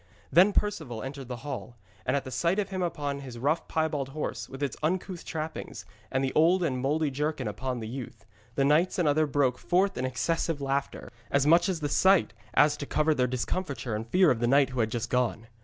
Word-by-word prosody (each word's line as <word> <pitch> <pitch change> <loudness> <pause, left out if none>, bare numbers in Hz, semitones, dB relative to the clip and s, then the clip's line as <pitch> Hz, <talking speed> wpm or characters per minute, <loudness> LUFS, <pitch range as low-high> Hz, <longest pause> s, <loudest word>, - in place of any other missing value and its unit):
Then 185 +4 +6
Perceval 160 - -2
entered 135 -1 -7
the 125 - -4
hall, 130 -4 -6 0.3
and 130 +2 +2
at 130 -2 -5
sight 170 - +1
of 210 - -1
him 190 -1 -3
upon 145 -5 -2
his 130 -4 -8
rough 145 +7 0
piebald 155 -4 -1
horse, 130 -7 -4
with 135 +2 -6
its 140 - -2
uncouth 180 +2 -2
trappings, 155 - -5 0.3
and 135 0 0
the 135 - -1
old 175 +4 +4
and 130 -6 0
mouldy 150 +2 +1
jerkin 145 -2 -2
upon 125 +4 -3
the 110 - -5
youth, 125 0 -8 0.3
the 135 - +2
knights 155 +6 +3
and 175 -4 +2
others 150 +1 +2
broke 135 -3 +1
forth 190 0 +1
in 130 - 0
excessive 165 +4 -1
laughter, 140 0 -3 0.2
as 140 0 +2
much 170 +5 +5
at 175 -4 -2
the 145 - 0
sight 190 - +4 0.2
as 150 0 +5
to 145 - -6
cover 155 +1 +2
their 125 -3 +1
discomfiture 130 0 -3
and 110 +2 -4
fear 185 +1 +5
of 120 - 0
the 120 - +1
knight 140 +1 +4
who 130 - -4
had 110 -1 +2
just 120 +2 -3
gone. 125 -3 0
140 Hz, 215 wpm, -28 LUFS, 130-160 Hz, 0.3 s, Then